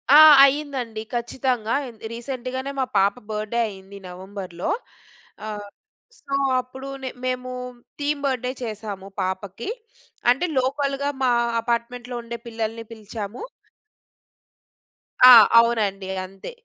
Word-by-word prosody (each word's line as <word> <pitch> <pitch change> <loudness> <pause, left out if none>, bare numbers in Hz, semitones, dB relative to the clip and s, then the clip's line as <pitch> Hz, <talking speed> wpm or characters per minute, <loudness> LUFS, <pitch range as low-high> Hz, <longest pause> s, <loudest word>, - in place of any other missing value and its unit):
ఆ! - - +11 0.3
అయిందండి 270 -6 -2
ఖచ్చితంగా. 240 -1 -1 0.4
రీసెంట్‌గానే 260 +2 -5
మా 260 - +2
పాప 195 +1 +4 0.2
బర్త్‌డే‌ 215 +2 -2
అయ్యింది. 195 -1 -11
నవంబర్‌లో. 185 - -6 0.8
ఆహ్, 205 -1 -6 0.5
సో 275 - -8 0.3
అప్పుడు 265 +2 -10 0.2
నె 260 - -2 0.2
మేము 255 0 -2 0.5
థీమ్ 290 0 -1
బర్త్‌డే‌ 255 -2 -1
చేసాము 210 -4 -6
పాపకి. 190 - -4 0.6
అంటే 270 +8 +1
లోకల్‌గా 275 +1 -1
మా 250 - +4 0.3
అపార్ట్మెంట్‌లో 240 +1 -3
ఉండే 235 0 -6
పిల్లల్ని 225 0 -4
పిలిచాము. 215 - -7 1.8
ఆ! - - +12 0.3
అవునండి 210 -5 +1 0.2
అంతే. 195 - -10
235 Hz, 100 wpm, -23 LUFS, 205-255 Hz, 1.8 s, ఆ